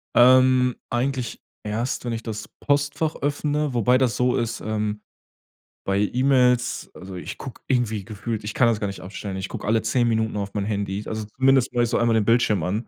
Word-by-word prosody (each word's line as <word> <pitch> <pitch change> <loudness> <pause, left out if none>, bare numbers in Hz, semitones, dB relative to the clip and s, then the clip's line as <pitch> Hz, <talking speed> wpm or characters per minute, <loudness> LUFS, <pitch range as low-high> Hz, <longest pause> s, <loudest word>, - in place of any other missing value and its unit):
Ähm, 130 0 +6
eigentlich 125 0 -2 0.2
erst, 115 +6 -2
wenn 120 - -2
ich 115 0 -5
das 110 -2 -5
Postfach 145 +2 0
öffne, 145 0 -1
wobei 125 +1 +3
das 130 -3 +1
so 125 0 +2
ist 115 0 -2
ähm 105 -1 -2 0.9
bei 100 0 +2
E-Mails, 125 +2 +2
also, 95 +1 -9
ich 90 +2 -7
guck 130 -4 -9
irgendwie 115 -6 0
gefühlt- 110 +1 -5
ich 105 - -5
kann 120 - +4
das 115 -2 +1
gar 100 - -1
nicht 100 - -6
aufstellen- 95 +1 -6
ich 95 0 -4
guck - - -6
alle 110 +1 +2
10 120 +2 +2
Minuten 110 -1 0
auf 100 -1 -3
mein 100 -1 -1
Handy. 100 -1 -2
Also, 110 -1 -4
zumindest 135 -1 +3
mach 120 -1 +2
ich 120 - 0
so 120 - +1
einmal 115 -1 +3
den 110 - +2
Bildschirm 115 -2 +3
an. 105 +6 -2
115 Hz, 200 wpm, -23 LUFS, 105-125 Hz, 0.9 s, Ähm